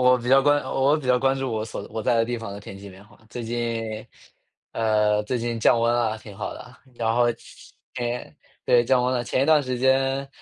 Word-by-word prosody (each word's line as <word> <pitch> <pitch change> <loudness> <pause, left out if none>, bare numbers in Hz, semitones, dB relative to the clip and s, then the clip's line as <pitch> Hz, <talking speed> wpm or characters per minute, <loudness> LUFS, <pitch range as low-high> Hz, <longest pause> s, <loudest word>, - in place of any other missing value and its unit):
我 125 0 +5
比 120 0 -6
较 135 +1 +6
关 145 +1 +3
我 135 +3 +1
比 155 - -7
较 125 0 +3
关 135 +1 +1
注 135 -1 -3
我 110 -1 -2
所 110 -2 -7
我 110 - -4
在 110 - +1
的 115 0 +3
地 120 +1 -3
方 115 -3 -7
的 100 - -8
天 95 0 -10
气 100 +1 -10
变 95 +1 -14
化， 105 -1 -21
最 120 - -6
近 115 -1 -3 0.6
呃， 105 -1 +1
最 125 +4 -2
近 120 -1 -3
降 115 +1 +4
温 115 0 +2
了， 115 -2 0
挺 105 -2 -12
好 - - -5
的。 - - -12 0.2
然 115 -1 -1
后， 120 +1 +3 0.7
天 120 -8 -4 0.3
对， 120 -1 +4
降 125 +1 +3
温 125 - +1
了。 120 -1 -1
前 130 - 0
一 - - +1
段 155 -1 +5
时 130 -2 -3
间， 135 +2 +1
120 Hz, 255 characters per minute, -24 LUFS, 110-130 Hz, 0.7 s, 较